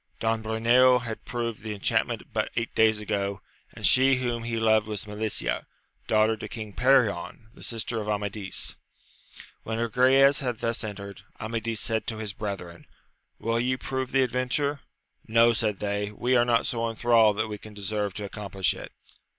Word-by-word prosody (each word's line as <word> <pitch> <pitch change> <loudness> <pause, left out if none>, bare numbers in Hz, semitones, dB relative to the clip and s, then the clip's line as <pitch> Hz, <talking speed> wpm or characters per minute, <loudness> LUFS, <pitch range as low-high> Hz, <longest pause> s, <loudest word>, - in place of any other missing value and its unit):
Don 115 0 0
Bruneo 120 +3 +4
had 115 -2 -6
proved 115 -3 -3
the 105 -1 -5
enchantment 100 - -1
but - - 0
eight 115 -1 -2
days 110 -1 +4
ago, 100 -2 -2 0.3
and - - -5
she 135 +1 +6
whom 120 -2 -2
he 115 -1 -2
loved 110 -1 +3
was 105 -1 -4
Melicia, 105 - -1 0.4
daughter 110 0 +3
to - - -6
King 110 -3 -7
Perion, 120 -3 +1
the - - -16
sister 115 0 -1
of 105 - -5
Amadis. 105 -2 -2 0.9
When 110 0 -4
Agrayes 130 +4 +4
had 125 -4 -2
thus 115 +1 -2
entered, 100 -2 -7 0.2
Amadis 115 0 -2
said 110 -2 -1
to 110 - -3
his 105 -2 -4
brethren, 95 -5 -6 0.5
will 115 +1 -1
ye 130 +2 0
prove 130 -1 -3
the 135 0 +4
adventure 130 +4 -1 0.5
1 110 - -12
No, 115 0 +6
said 110 -3 0
they, 100 0 -2
we 120 +4 0
are 120 -1 +5
not 120 -1 +2
so 115 -1 -1
enthralled 115 -2 +4
that 110 0 0
we 105 -1 -6
can 105 0 -12
deserve 105 -1 -2
to 105 - -4
ac 100 - -8
complish 95 -3 -1
it. - - -9
110 Hz, 175 wpm, -26 LUFS, 105-120 Hz, 0.9 s, she